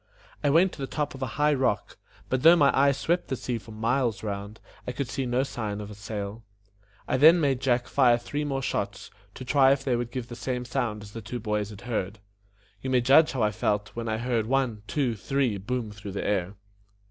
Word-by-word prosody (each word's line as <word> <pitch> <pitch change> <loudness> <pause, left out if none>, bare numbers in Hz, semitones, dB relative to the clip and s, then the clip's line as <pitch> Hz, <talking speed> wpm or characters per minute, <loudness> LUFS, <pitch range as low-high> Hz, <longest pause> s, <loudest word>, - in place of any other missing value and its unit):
I 145 - +3
went 170 +6 +4
to - - -13
the 135 - -2
top 150 0 -2
of 135 - -10
a 130 - -1
high 150 0 +3
rock, 130 -6 -1 0.3
but 130 0 0
though 165 +4 +8
my 145 -4 +4
eye 140 +1 +5
swept 170 +6 -1
the 135 - -2
sea 120 -1 -3
for 110 - -16
miles 115 +1 -1
round, 100 0 -5 0.3
I 125 - -2
could 135 +1 -3
see 130 +1 -3
no 125 +2 +1
signs 110 -6 -4
of 105 0 -7
a - - -7
sail. 105 +1 -6 0.6
I - - +1
then 160 +6 +7
made 135 -5 +1
Jack 125 -2 +1
fire 125 -4 +4
three 145 +5 -4
more 135 -2 -2
shots, - - -3 0.2
to 130 - -8
try 135 +1 +5
if 135 -1 -3
they 130 -3 +1
would 120 0 -2
give 120 -1 -5
the 120 - -8
same 125 0 -3
sound 110 -3 -2
as 105 - -11
the 115 - -7
two 115 +4 -5
boys 105 -2 -2
had 105 -2 -11
heard. 110 -4 -3 0.6
You 130 - -4
may 130 -1 +3
judge 140 +6 +5
how 125 -4 0
I 105 - +2
felt, 105 0 -1
when 115 -1 -5
I 110 - 0
heard 115 -2 -1
one! 130 -4 0
two! 135 -6 0
three! 115 0 -1
boom 115 +2 -3
through 100 -1 -8
the 100 - -3
air. 100 -1 -1
120 Hz, 230 wpm, -27 LUFS, 105-135 Hz, 0.6 s, though